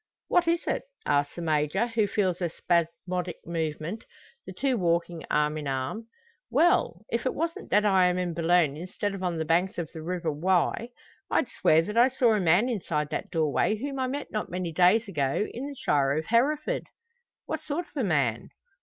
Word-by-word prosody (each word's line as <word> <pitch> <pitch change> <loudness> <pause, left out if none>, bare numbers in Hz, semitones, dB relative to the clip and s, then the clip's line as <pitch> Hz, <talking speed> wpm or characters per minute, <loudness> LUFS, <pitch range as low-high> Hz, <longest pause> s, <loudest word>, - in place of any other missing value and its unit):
"What 345 -1 +3
is 335 +1 +2
it?" - - -1 0.2
asks 145 0 +1
the 175 - -5
Major, 155 +6 +1
who 230 -3 0
feels 190 -4 0
the 175 -2 -1
spasmodic 170 +1 -1
movement 165 +4 -3 0.4
the - - -6
two 270 -2 0
walking 170 -3 0
arm 150 +1 +1
in 150 - -5
arm. 135 - -3 0.4
"Well! 320 - +2
if 235 +3 0
it - - -2
wasn't 330 +2 -3
that 210 +1 +3
I 190 -3 +5
am 180 0 +1
in 180 -2 -1
Boulogne 165 -3 +2
instead 185 +5 -4
of 195 - -6
on 175 -2 -1
the 160 - -2
banks 175 +4 +1
of 170 -3 -4
the 160 - -7
river 170 -1 -2
Wye, 180 +8 +1 0.4
I'd 265 - +1
swear 160 +1 +3
that 210 +6 -1
I 245 +2 +6
saw 245 -3 +3
a 210 - +2
man 180 +6 +4
inside 165 - -2
that - - -3
doorway 160 +5 +1
whom 275 +4 -4
I 260 - 0
met 280 +2 -5
not 215 - -3
many 180 -1 -3
days 185 +7 +4
ago 150 +2 0
in 260 +4 -5
the 285 - -7
shire 140 - +1
of 160 - -2
Hereford." 295 - +1 0.6
"What - - -3
sort 320 +4 -3
of - - -28
a 270 - 0
man?" 140 - 0
180 Hz, 200 wpm, -27 LUFS, 160-230 Hz, 0.6 s, I